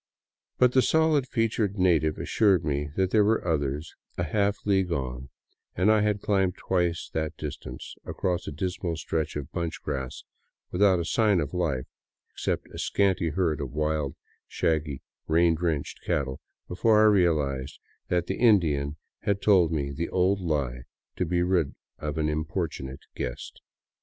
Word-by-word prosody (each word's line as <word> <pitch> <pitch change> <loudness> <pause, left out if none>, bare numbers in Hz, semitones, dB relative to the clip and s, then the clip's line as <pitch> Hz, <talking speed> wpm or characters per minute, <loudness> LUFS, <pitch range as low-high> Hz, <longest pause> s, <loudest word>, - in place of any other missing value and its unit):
But 125 -1 +5
the 130 - +5
stolid 160 -2 +3
featured 110 -4 0
native 80 -5 +3
assured 100 -5 +2
me 75 -1 -1
there 95 +3 +3
were 110 -3 +1
others 75 -1 -1 0.2
a 85 - 0
half 100 +4 +1
league 95 -3 +2
on, 65 -3 -3 0.5
and 95 +5 +4
I 110 -1 +4
had 105 -1 0
climbed 95 -3 +1
twice 90 -2 0
that 80 0 -2
distance 75 -2 -7
across 90 -1 -2
a - - -3
dismal 85 +1 -3
stretch 80 0 -2
of 75 -1 -5
bunch 85 -2 -3
grass 65 -3 -4 0.5
without 95 0 +4
a 85 - -2
sign 105 -1 +3
of 75 -1 -3
life, 75 -8 -1 0.5
except - - -2
a - - -7
scanty 95 -4 +1
herd 80 -2 0
of 70 -3 -5
wild, 75 -2 -1 0.3
shaggy, 75 -4 -1 0.2
rain 85 +1 +4
drenched 80 -3 -2
cattle, 65 -2 -1 0.3
before 105 +4 +3
I 110 - +6
realized 75 -10 +2 0.3
that 90 -1 +1
the - - -3
Indian 80 - +3 0.2
had 100 -1 0
told 95 -6 +4
the 70 +1 -2
old 95 +2 +2
j - - -8
lie 70 -6 -1 0.4
to 90 - 0
be 85 +1 +1
rid 90 -6 +1 0.2
of 75 0 -4
an 75 -1 +1
importunate 75 -3 -3
guest. 60 +3 -5
85 Hz, 155 wpm, -27 LUFS, 75-95 Hz, 0.5 s, I